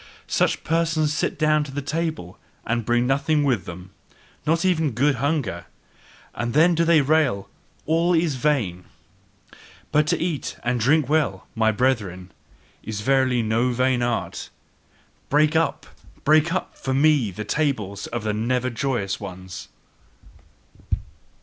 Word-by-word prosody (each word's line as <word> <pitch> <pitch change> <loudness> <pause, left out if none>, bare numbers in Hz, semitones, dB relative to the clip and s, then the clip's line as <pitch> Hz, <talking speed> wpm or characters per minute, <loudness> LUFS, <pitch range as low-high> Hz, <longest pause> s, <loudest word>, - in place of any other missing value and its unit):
Such - - 0
persons 160 -2 +1
sit - - -1
down 155 0 +3
to 145 - -8
the 145 +1 -4
table 155 - -3 0.3
and 115 0 -1
bring 120 0 +2
nothing 140 +3 +1
with 120 -11 +1
them, 90 +2 -9 0.6
not 165 +3 +2
even 160 -7 +1
good 140 +4 +2
hunger: 125 - -1 0.7
and 120 +1 -3
then 165 +3 +5
do 165 0 +2
they 165 -2 +5
rail: 135 -9 +1 0.4
"All 165 +3 +2
is 165 -2 +2
vain!" 120 - -1 1.1
But 150 0 +3
to 170 - +1
eat 165 -5 -3
and 120 +1 0
drink 140 +4 +3
well, 135 - 0
my 110 -1 +2
brethren, 105 -7 -1 0.5
is 105 -1 -5
verily 130 0 +2
no 115 +3 +1
vain 130 0 +1
art! 120 -1 -2 0.8
Break 150 +2 +3
up, 160 0 +1 0.4
break 155 +2 +4
up 185 - -3
for 130 0 -3
me 145 -5 +3
the 105 +3 -6
tables 105 -8 -1
of 120 -2 -4
the 105 -1 -1
never 125 +3 0
joyous 120 -5 -2
ones! 90 0 -8
135 Hz, 140 wpm, -23 LUFS, 110-155 Hz, 1.1 s, then